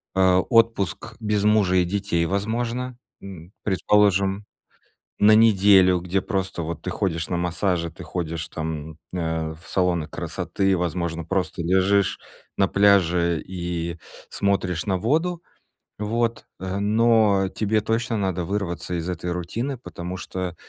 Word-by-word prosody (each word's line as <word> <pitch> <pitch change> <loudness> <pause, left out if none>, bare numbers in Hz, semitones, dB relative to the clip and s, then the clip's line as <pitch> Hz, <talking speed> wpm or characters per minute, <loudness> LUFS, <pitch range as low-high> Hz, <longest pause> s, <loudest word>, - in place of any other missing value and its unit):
э, 95 -1 +4
отпуск 115 -1 +1
без 105 -2 0
мужа 105 -3 +3
и 90 - +4
детей, 95 -2 -1
возможно, 115 +6 -2 0.2
м, 90 -3 -10
предположим, 100 0 +2 0.8
на 105 +1 +7
неделю, 100 -4 +5
где 90 +2 -1
просто, 95 -2 -2
вот, 80 0 -5
ты - - -4
ходишь 80 -4 -2
на 90 - -1
массажи, 90 -1 -1
ты - - -11
ходишь 85 -2 -4
там, 80 -1 -5 0.2
э, 80 -2 -2
в 80 +4 -16
салоны 90 -4 0
красоты, 95 -1 -1
возможно, 85 -1 -2
просто 95 0 -2
лежишь 95 +3 +2 0.4
на 95 - +3
пляже 90 -4 +3
и 85 -2 -4 0.3
смотришь 95 -4 -1
на 95 -2 0
воду, 165 - 0 0.6
вот, 115 +2 -1 0.2
э. 95 +1 -3
Но 105 -2 +3
тебе 110 +2 0
точно 115 +2 -1
надо 95 -3 -1
вырваться 95 -2 -3
из 85 +1 -4
этой 90 0 -3
рутины, 115 +11 -3
потому 90 -6 -7
что, 90 -1 -5
95 Hz, 135 wpm, -23 LUFS, 85-105 Hz, 0.8 s, на